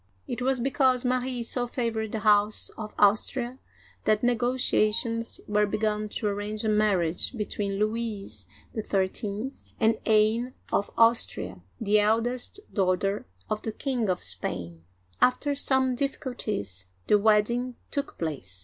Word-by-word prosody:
It 245 - -4
was 260 0 +1
because 260 0 +2
Marie 250 -1 0
so 245 +1 0
favored 230 -3 -2
the 220 - -3
House 210 0 +3
of 215 -1 -7
Austria 240 +5 +2 0.5
that 215 +1 +2
negotiations 230 -1 +1
were 210 0 +2
begun 210 0 -1
to 215 - -4
arrange 210 +1 -2
a 220 - +1
marriage 200 -5 +2
be 210 - -1
tween 200 -1 -3
Louis 210 - -3 0.3
XIII. 205 +3 -2 0.3
and 225 -1 +3
Anne 220 +3 +3 0.2
of 200 - +1
Austria, 225 - +2 0.2
the 210 -1 +3
eldest 230 - 0
daugh 185 -3 +2
ter 195 +1 -1 0.2
of 215 - -2
the 220 - -3
King 245 -2 -2
of 180 -1 -1
Spain. 85 -2 -2 0.4
After 285 +3 +3
some 265 -2 +2
difficulties, 240 - -3 0.2
the 210 - +4
wedding 225 +4 +2 0.2
took 280 - -3
place. 130 - -3
215 Hz, 135 wpm, -27 LUFS, 205-245 Hz, 0.5 s, the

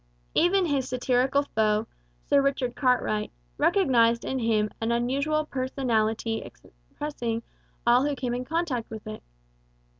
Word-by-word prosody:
Even 365 +2 +3
his 275 -5 0
satirical 255 +2 +1
foe, 215 -4 +1 0.4
Sir 280 - +4
Richard 270 -3 0
Cartwright, 250 -5 +1 0.3
recognized 260 - +3
in 265 - -2
him 215 -3 +1
an 225 +1 0
unusual 280 +6 0
personality 230 -5 -1 0.5
impressing 235 -6 -4 0.4
all 240 +2 +5
who 290 - -1
came 250 -2 -3
in 250 +1 -2
contact 300 -5 -2
with 220 -1 -8
it. 215 0 -7
250 Hz, 125 wpm, -26 LUFS, 230-280 Hz, 0.5 s, all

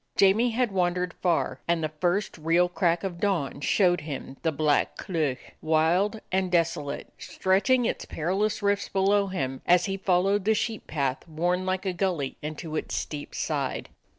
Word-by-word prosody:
Jamie 205 +5 +5
had 240 -1 0
wandered 180 -1 0
far, 175 -3 +1
and 170 -1 +1
the 155 - 0
first 180 +5 0
real 165 +3 +3
crack 175 -1 +1
of 180 -3 -4
dawn 175 -10 -1
showed 175 +4 +3
him 140 -3 -6
the 165 - +1
Black 145 0 +1
Cleuch, 155 -8 -2
wild 170 +7 +2
and 185 -1 0
desolate, 160 -4 -1
stretching 220 +7 +2
its - - -2
perilous 195 +7 -1
rifts 200 0 +1
below 200 +1 +2
him 135 -8 -3
as 180 0 +5
he 195 -1 -2
followed 195 +1 +2
the 220 +2 +3
sheep 220 0 -3
path 140 -1 -2
worn 175 +3 -1
like 185 +1 -1
a 190 - 0
gully 175 -7 -1
into 155 +1 -5
its - - -3
steep 145 -1 -5
side. - - -2
180 Hz, 165 wpm, -27 LUFS, 160-195 Hz, -, Jamie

